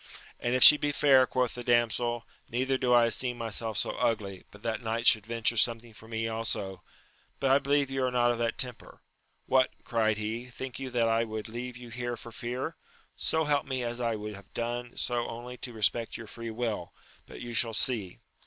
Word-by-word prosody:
And 120 +1 0
if 130 - +5
she 150 - +12
be 145 0 -1
fair, 135 -3 +5
quoth 125 -2 0
the 120 - -6
damsel, 120 0 +1 0.2
neither 130 +3 0
do 125 -1 0
I 120 -1 +6
esteem 120 +1 0
myself 115 -2 -3
so - - +2
ugly, 100 -4 -2
but 105 - -16
that 115 0 -2
knight 115 0 -2
should 110 -3 +5
venture 115 0 0
something 115 0 +2
for 110 +1 -15
me 115 0 -2
also; 105 -5 -2 0.6
but 135 -1 +2
I 135 - +6
believe 140 0 +1
you 135 -1 -1
are 130 - +2
not 120 -1 +2
of 120 - -3
that 115 -1 -1
temper. 125 -2 -4 0.4
What! 130 0 +3
cried 110 -3 +1
he, 110 +3 -3
think 125 +1 -7
you 135 -1 -5
that 120 -2 +1
I 115 0 +2
would 110 -1 -5
leave 120 +2 -6
you 125 -1 -11
here 120 +1 -4
for 115 - -10
fear? 125 +7 -4 0.4
so 160 0 +1
help 145 -2 +1
me 130 -2 -2
as 120 0 -3
I 115 -2 0
would 105 0 -6
have 100 -1 -13
done 120 +1 -3
so 120 -1 -1
only 120 +2 -7
to 125 - -6
respect 115 +1 +1
your 115 - -8
free 115 +2 -7
will, 110 -6 -4 0.3
but - - -10
you 120 0 -6
shall 115 0 +2
see. 110 -7 -1
120 Hz, 210 wpm, -29 LUFS, 115-125 Hz, 0.6 s, she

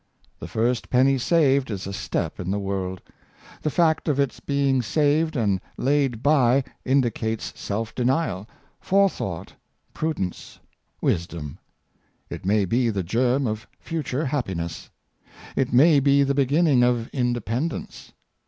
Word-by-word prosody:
The - - -7
first 120 +2 -1
penny 130 +1 +3
saved 140 -3 +3
is 100 -3 -4
a 100 - -5
step 100 0 -3
in 90 - -4
the 100 - 0
world. 95 -2 -3 0.6
The 155 - 0
fact 160 0 +2
of 145 -2 +1
its 140 -2 0
being 140 -2 +1
saved 155 +5 +1
and 100 -7 +1 0.2
laid 135 -4 +1
by 135 -3 +4 0.2
indicates 120 -4 0
self 110 +2 -4
denial, 125 - 0 0.3
forethought, 190 - 0 0.4
prudence, 155 - -4 0.4
wisdom. 80 -4 -2 0.7
It - - -6
may 105 0 +3
be 120 +5 +1
the 100 -4 -1
germ 125 +8 +1
of 110 -1 -3
future 150 -3 -3
happiness. 95 - -3 0.7
It 135 - 0
may 145 +4 +6
be 140 +1 +4
the 140 0 +1
beginning 140 0 +3
of 120 -1 +2
independence. 125 +3 -3
125 Hz, 130 wpm, -24 LUFS, 105-140 Hz, 0.7 s, may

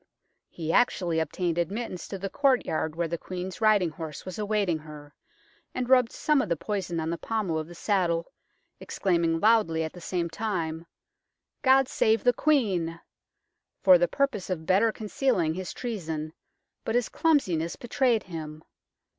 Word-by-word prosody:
He 160 -1 -4
actually 175 -9 +2
obtained 170 +2 -1
admittance 185 +1 -3
to 195 - -5
the 195 +1 -4
courtyard 245 - +1
where 170 0 -1
the 170 0 -4
Queen's 185 +2 -6
riding 210 -6 +4
horse 155 -2 -7
was 185 +2 -6
awaiting 205 -6 0
her, 150 -1 -12 0.6
and 250 - -2
rubbed 250 -2 +4
some 300 -3 +2
of 210 - -4
the 170 - +2
poison 185 -3 -3
on 160 +1 -2
the 170 - -3
pommel 205 -8 -1
of 155 - -5
the 175 - -11
saddle, 175 0 0 0.5
exclaiming 170 -3 0
loudly 205 -7 +3
at 160 - -5
the 175 - -11
same 175 0 -2
time, 170 -4 -3 0.4
" - - -58
God 270 -1 +5
save 220 -3 +2
the 245 - +4
Queen! 195 - +1 0.4
" - - -56
for 185 -2 +8
the 175 - +3
purpose 275 -5 -1
of 165 -4 -3
better 200 +6 +3
concealing 210 - 0
his 185 +1 -5
treason, 160 -10 -4 0.5
but 225 - -2
his 245 -1 +2
clumsiness 185 - +1
betrayed 240 -1 +1
him. 155 -3 -8
180 Hz, 165 wpm, -27 LUFS, 165-220 Hz, 0.6 s, for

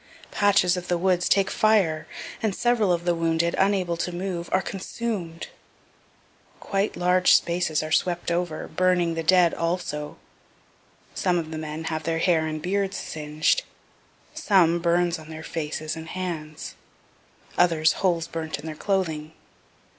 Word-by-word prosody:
Patches 200 -3 +3
of 180 0 -5
the 175 - +1
woods 180 0 +1
take 195 -1 +3
fire, 195 -8 +2 0.3
and 215 -4 0
several 235 -5 +2
of 170 0 0
the 175 - +3
wounded, 165 0 +1
unable 190 -3 +2
to 180 - -2
move, 175 -1 -4
are 185 - +3
consumed 190 -3 -5 1.1
quite 195 +1 -1
large 180 +1 +4
spaces 170 -3 +1
are 155 - -6
swept 175 +1 +1
over, 170 -2 -2
burning 180 0 +1
the 165 - -2
dead 175 +1 +4
also 165 -3 -3 1.0
some 180 -2 +1
of 160 -2 -3
the 160 - -4
men 155 +1 -5
have 160 -1 -2
their 165 +1 -1
hair 165 -2 +2
and 155 0 -4
beards 195 +1 -1
singed 155 - 0 0.7
some, 175 -4 +3
burns 175 0 +1
on 155 0 -12
their 160 0 -8
faces 155 -1 -4
and 160 0 -8
hands 160 -4 -5 0.8
others 160 -3 +3
holes 170 -4 +1
burnt 160 -1 -4
in - - -11
their 160 - -4
clothing. 160 -4 -2
170 Hz, 145 wpm, -25 LUFS, 160-185 Hz, 1.1 s, large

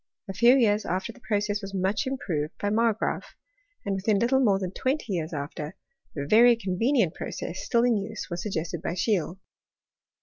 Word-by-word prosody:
A 195 - -5
few 240 +5 +6
years 215 -5 +3
aftef 185 +2 -3
the 260 - -18
process 210 -2 -1
was 195 -1 -7
much 195 +9 0
improved 165 - -3
by 205 - -1
Margraaf; 225 0 0 0.5
and, 200 - -1
within 200 +2 +1
little 245 +5 +3
more 210 -7 +3
than 185 -2 -4
twenty 260 0 -2
years 165 -2 -2
after, 150 +2 -5 0.4
the 140 -2 -3
very 235 +8 +6
convenient 225 - +1
process 185 - -5
still 235 0 +2
in 240 -3 +3
use 210 +2 -5
was 175 -2 -4
suggested 170 -4 -3
by 175 - -3
Scheele. 185 -2 0
205 Hz, 175 wpm, -26 LUFS, 180-230 Hz, 0.5 s, few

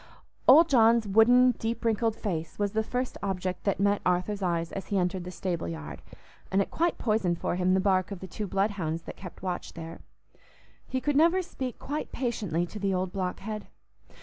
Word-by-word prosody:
Old 315 +5 +8
John's 230 -5 +4
wooden, 245 +5 +6
deep 230 +1 -3
wrinkled 225 0 +1
face 165 -8 -4
was 205 -1 0
the 220 - +1
first 250 +3 -3
object 185 -2 -3
that 200 -2 +1
met 200 +1 +2
Arthur's 180 +3 0
eyes 170 -2 -1
as 195 - -6
he 200 - 0
entered 180 0 -1
the - - -5
stable 180 - -3
yard, 75 -4 -7 0.5
and 190 - +3
it 195 - 0
quite 340 +1 +1
poisoned 210 -7 +1
for - - -2
him 185 +1 +2
the - - +3
bark 185 -1 +2
of 200 -3 -6
the 190 - -7
two 205 +3 -5
bloodhounds 190 -5 -1
that - - -8
kept 180 -1 -11
watch 180 -2 -4
there. 165 0 -8 0.9
He 260 0 -2
could 290 +1 0
never 340 +5 +4
speak 260 -7 -5
quite 295 +2 -4
patiently 205 -9 -1
to 210 +4 -8
the 195 -1 0
old 185 0 -1
blockhead. 195 +3 -4
195 Hz, 195 wpm, -28 LUFS, 180-225 Hz, 0.9 s, Old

